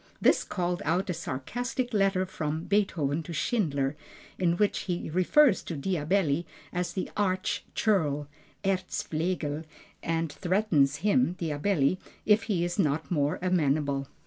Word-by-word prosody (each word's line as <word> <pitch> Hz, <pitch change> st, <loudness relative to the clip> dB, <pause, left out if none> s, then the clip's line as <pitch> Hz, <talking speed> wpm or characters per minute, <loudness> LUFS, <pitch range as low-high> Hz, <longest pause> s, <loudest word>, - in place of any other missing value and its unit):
This -, -, +4 dB
called 180 Hz, 0 st, -2 dB
out 180 Hz, +4 st, 0 dB
a -, -, -1 dB
sarcastic 245 Hz, -, -3 dB
letter 195 Hz, -2 st, +2 dB
from 155 Hz, -3 st, -3 dB
Beethoven 165 Hz, -8 st, +1 dB
to 170 Hz, +1 st, -7 dB
Schindler, 150 Hz, -, 0 dB, 0.4 s
in 175 Hz, -2 st, +2 dB
which 210 Hz, +1 st, +2 dB
he 175 Hz, -3 st, -3 dB
refers 190 Hz, -, +4 dB
to 165 Hz, -, -5 dB
Diabelli 170 Hz, 0 st, +1 dB, 0.3 s
as 180 Hz, +1 st, -2 dB
an 185 Hz, -, -2 dB
arch 185 Hz, -2 st, 0 dB
churl 150 Hz, -9 st, +1 dB, 0.4 s
(Erzflegel), 170 Hz, -4 st, -1 dB, 0.4 s
and 165 Hz, -1 st, -1 dB
threatens 175 Hz, -7 st, +2 dB
him 210 Hz, -3 st, +3 dB
(Diabelli), 165 Hz, 0 st, +1 dB, 0.3 s
if 215 Hz, +1 st, +4 dB
he 175 Hz, -4 st, +1 dB
is 175 Hz, +3 st, -3 dB
not 155 Hz, -2 st, +1 dB
more 145 Hz, -3 st, +1 dB
amenable. 145 Hz, -6 st, +1 dB
175 Hz, 130 wpm, -28 LUFS, 150-195 Hz, 0.4 s, This